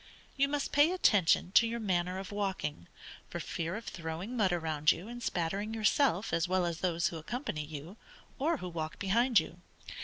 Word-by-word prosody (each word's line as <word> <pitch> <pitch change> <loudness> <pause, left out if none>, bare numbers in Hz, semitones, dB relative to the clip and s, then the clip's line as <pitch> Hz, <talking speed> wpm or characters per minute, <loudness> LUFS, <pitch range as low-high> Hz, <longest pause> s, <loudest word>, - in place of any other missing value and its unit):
You 275 +1 +3
must 285 0 -2
pay 290 +4 +5
attention 195 - +3
to 230 +3 +6
your 235 +1 -3
manner 180 -3 0
of 190 0 -6
walking, 190 - -3 0.4
for - - -5
fear 170 +2 -3
of 225 - -6
throwing 170 +7 -5
mud 205 -6 +2
around 160 -3 +2
you, 185 - -5
and 240 +1 -7
spattering 200 +3 -2
yourself 220 - +2
as 165 0 +2
well 185 0 +1
as 170 -1 -3
those 170 -2 +1
who 165 - -6
accompany 160 - -4
you, 155 +6 -8 0.4
or 315 +4 +1
who 180 -7 -6
walk 160 -2 -4
behind 230 +4 +3
you. 175 +2 -7
185 Hz, 185 wpm, -32 LUFS, 165-230 Hz, 0.4 s, to